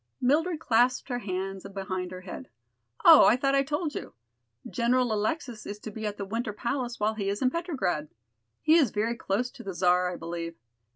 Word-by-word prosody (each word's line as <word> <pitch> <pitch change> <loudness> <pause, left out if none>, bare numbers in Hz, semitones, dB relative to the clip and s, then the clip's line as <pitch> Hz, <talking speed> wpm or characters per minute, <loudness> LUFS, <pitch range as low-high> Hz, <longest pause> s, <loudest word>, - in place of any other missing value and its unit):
Mildred 310 +6 +2
clasped 245 -1 +2
her 245 -1 -1
hands 190 -2 -4
behind 190 -2 -4
her 185 0 -8
head. 185 - -8 0.6
"Oh, - - +10
I 225 - +6
thought 275 +2 +1
I 275 - +4
told 295 +2 -2
you. - - -7 0.5
General 235 +4 +1
Alexis 220 +1 -2
is 205 - -5
to 215 +1 -8
be 220 +1 -4
at 205 0 -5
the 200 - -4
Winter 220 +1 -3
Palace 245 +2 -3
while 210 +1 +1
he 200 -3 -2
is 200 +1 -2
in 255 -1 +2
Petrograd. 265 - -2 0.6
He 310 - +5
is 290 -8 +4
very 220 +3 -1
close 235 +3 -1
to - - -12
the 195 -2 -6
Czar, 180 0 +3
I - - -5
believe. 170 0 -5
220 Hz, 195 wpm, -28 LUFS, 195-255 Hz, 0.6 s, Oh